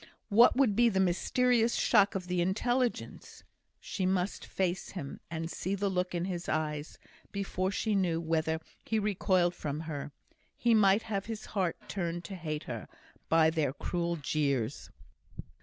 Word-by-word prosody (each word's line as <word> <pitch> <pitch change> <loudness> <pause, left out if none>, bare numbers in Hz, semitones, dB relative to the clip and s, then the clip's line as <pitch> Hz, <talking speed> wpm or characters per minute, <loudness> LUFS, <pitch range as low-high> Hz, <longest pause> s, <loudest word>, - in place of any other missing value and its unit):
What 230 +3 +6
would 250 -6 +3
be 240 +2 +5
the 190 -3 0
mysterious 230 +6 +2
shock 205 -2 +4
of 185 -2 -2
the 180 -1 0
intelligence? 240 +7 -1 0.4
She 190 - -4
must 185 +1 0
face 185 -1 -1
him, 155 -8 -6
and 165 0 -3
see 190 +3 -2
the 200 0 0
look 180 -1 -1
in 175 0 -1
his 175 -2 -4
eyes, 150 -1 -2 0.3
before 195 -2 -1
she 215 +2 -1
knew 180 -4 +1
whether 160 -1 0 0.2
he 225 - -1
recoiled 190 -4 +2
from 150 -3 -4
her; 150 -3 -5 0.5
he 235 -1 +3
might 205 0 +5
have 200 -2 -3
his 220 -1 -5
heart 185 -5 +1
turned 175 -2 -3
to 195 - -7
hate 155 -4 -4
her, - - -6 0.4
by 160 -1 +5
their 155 -5 0
cruel 170 +3 -2
jeers. 140 -5 -1
180 Hz, 155 wpm, -31 LUFS, 165-205 Hz, 0.5 s, What